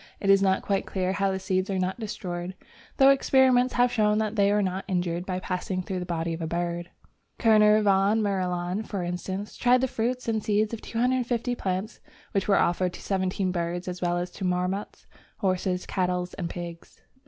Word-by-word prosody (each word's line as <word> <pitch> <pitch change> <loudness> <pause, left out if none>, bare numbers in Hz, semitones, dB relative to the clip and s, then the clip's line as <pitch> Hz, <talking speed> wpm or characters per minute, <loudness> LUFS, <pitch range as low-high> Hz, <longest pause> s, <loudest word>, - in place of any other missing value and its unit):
It 195 - +3
is 195 0 +5
not 190 -1 +2
quite 195 -1 -1
clear 185 -1 -1
how 195 0 +1
the 190 - -1
seeds 185 0 -1
are 195 - -1
not 185 +3 -1
destroyed, 185 -4 -5 0.4
though 270 0 +7
experiments 260 -2 +4
have 245 0 +3
shown 210 -2 +2
that 215 0 -1
they 200 -1 +3
are 205 0 +2
not 190 0 -2
injured, 175 -2 -1
by 185 -1 -2
passing 185 0 -3
through 185 0 -3
the 180 - -5
body 165 -1 -2
of 165 - -5
a 160 - -2
bird. 175 +1 -3 0.5
Kerner 215 -2 +5
von 200 +2 +3
Marilaun, 185 -2 -1
for 200 -4 -4
instance, 185 +3 -4
tried 250 +1 +3
the 260 - +2
fruits 245 +1 -2
and 220 -2 0
seeds 215 +1 +1
of 225 - -5
250 245 0 0
different 245 - -4
plants 190 +3 -3 0.3
which 195 - -1
were 200 - +4
offered 180 +1 +1
to - - -9
seventeen 190 -1 -1
birds, 175 0 -3
as 180 0 -5
well 175 -1 +1
as 175 0 -3
to 195 - -8
marmots, 180 +2 -2 0.3
horses, 185 -1 -1
cattle, 180 -1 -1
and 175 -4 -4
pigs. 170 -1 -8
190 Hz, 200 wpm, -26 LUFS, 180-215 Hz, 0.5 s, though